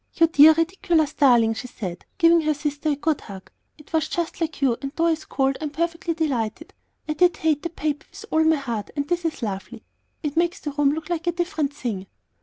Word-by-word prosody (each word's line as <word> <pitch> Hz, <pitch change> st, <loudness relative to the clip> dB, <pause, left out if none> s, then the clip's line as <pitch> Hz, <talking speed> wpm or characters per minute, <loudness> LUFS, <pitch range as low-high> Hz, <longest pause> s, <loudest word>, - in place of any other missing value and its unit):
"You 330 Hz, -, +5 dB
dear, 315 Hz, -1 st, +7 dB
ridiculous 330 Hz, -2 st, +1 dB
darling!" 240 Hz, -5 st, +4 dB
she 250 Hz, +3 st, -6 dB
said, 185 Hz, -7 st, -7 dB
giving 335 Hz, -1 st, +5 dB
her 305 Hz, -1 st, +1 dB
sister 295 Hz, +1 st, -2 dB
a 290 Hz, -, +2 dB
good 300 Hz, +1 st, -1 dB
hug; 195 Hz, -2 st, -11 dB, 0.3 s
"it 300 Hz, +1 st, -18 dB
was 315 Hz, -1 st, +1 dB
just 340 Hz, 0 st, -3 dB
like 320 Hz, -2 st, -2 dB
you, 265 Hz, -4 st, +2 dB
and 275 Hz, -1 st, -4 dB
though 335 Hz, -, +1 dB
I 335 Hz, -, +4 dB
scold 275 Hz, -4 st, -1 dB
I -, -, -2 dB
am -, -, -2 dB
perfectly 335 Hz, +2 st, -2 dB
delighted. 285 Hz, -3 st, -2 dB, 0.3 s
I 305 Hz, -, 0 dB
did 350 Hz, +2 st, +3 dB
hate 310 Hz, -2 st, +1 dB
that 340 Hz, -1 st, -6 dB
paper 300 Hz, 0 st, -2 dB
with 445 Hz, -, -11 dB
all 315 Hz, 0 st, +3 dB
my 320 Hz, 0 st, +4 dB
heart, 235 Hz, -8 st, -4 dB
and 285 Hz, -1 st, -2 dB
this 350 Hz, +1 st, -1 dB
is 315 Hz, -6 st, -2 dB
lovely. 215 Hz, +2 st, -5 dB, 0.4 s
It 295 Hz, -2 st, -2 dB
makes 345 Hz, +2 st, +1 dB
the 295 Hz, -, -4 dB
room 285 Hz, 0 st, +2 dB
look 315 Hz, +2 st, -6 dB
like 345 Hz, 0 st, -2 dB
a -, -, +4 dB
different 340 Hz, -4 st, -1 dB
thing." 200 Hz, -8 st, -4 dB
305 Hz, 225 wpm, -23 LUFS, 275-330 Hz, 0.4 s, dear